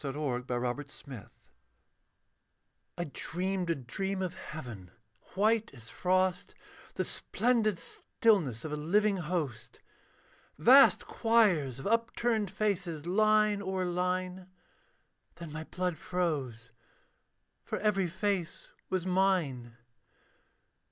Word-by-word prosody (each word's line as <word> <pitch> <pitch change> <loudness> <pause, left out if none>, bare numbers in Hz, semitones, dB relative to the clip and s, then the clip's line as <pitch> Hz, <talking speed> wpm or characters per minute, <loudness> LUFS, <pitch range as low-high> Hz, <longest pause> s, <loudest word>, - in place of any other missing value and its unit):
THE 140 -2 -3
MIRROR 140 -3 -2
OF 125 +3 -2 0.2
MADMEN 125 -7 -9 1.7
I 175 - -1
dreamed 185 +1 -2
a 165 - +2
dream 190 +9 -3
of 180 -2 -3
heaven, 120 - -8 0.5
white 220 +2 +2
as 115 -2 -10
frost, 185 0 0 0.4
The - - 0
splendid 225 -5 0
stillness 170 - 0
of 155 - -4
a - - -1
living 200 +7 +2
host; 155 -9 -4 0.8
Vast 255 - +7
choirs 200 - +2
of 135 - -8
upturned 230 -1 +1
faces, 185 -6 -2
line 215 +2 +3
o'er 190 -1 -2
line. 180 +1 -2 0.9
Then 170 -2 -9
my 160 +1 -6
blood 180 -3 -3
froze; 140 -12 -2 0.9
for - - -3
every 200 -3 +1
face 190 -1 -2 0.2
was 185 -2 -1
mine. 175 -11 0
180 Hz, 105 wpm, -31 LUFS, 150-200 Hz, 1.7 s, Vast